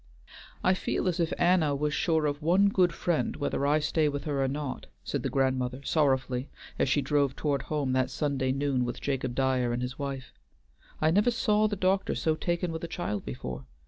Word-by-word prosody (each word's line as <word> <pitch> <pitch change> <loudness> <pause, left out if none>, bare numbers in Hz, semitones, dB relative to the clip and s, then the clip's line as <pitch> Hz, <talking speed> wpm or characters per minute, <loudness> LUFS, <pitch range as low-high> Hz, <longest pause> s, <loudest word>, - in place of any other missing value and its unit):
"I 185 - +4
feel 185 - -1
as 180 -1 0
if 170 0 +1
Anna 175 -5 +3
was 150 +1 -1
sure 160 0 +1
of 145 0 -1
one 185 +6 +4
good 185 -3 +3
friend, 170 -1 -1
whether 145 -1 -1
I 150 +1 +4
stay 155 0 +1
with 145 -1 -4
her 140 -3 0
or - - +1
not," 140 0 -4 0.2
said - - -2
the - - -2
grandmother 130 -1 0
sorrowfully, 135 -3 +1 0.3
as - - +2
she 140 +2 +2
drove 140 -1 +1
toward 140 -3 0
home 145 -4 -1
that 130 0 +1
Sunday 140 -3 -1
noon 135 -2 0
with 120 0 -4
Jacob 130 -3 -2
Dyer 130 -2 +1
and 120 +1 -2
his 125 +2 -5
wife. 135 -2 -5 0.7
"I 155 +1 +3
never 205 +7 +4
saw 215 -2 +2
the 205 - -2
doctor 190 0 +1
so 160 - +1
taken 175 +1 -1
with 160 0 -5
a - - -2
child 105 - -3
before. 65 +1 -6
145 Hz, 205 wpm, -28 LUFS, 130-165 Hz, 0.7 s, I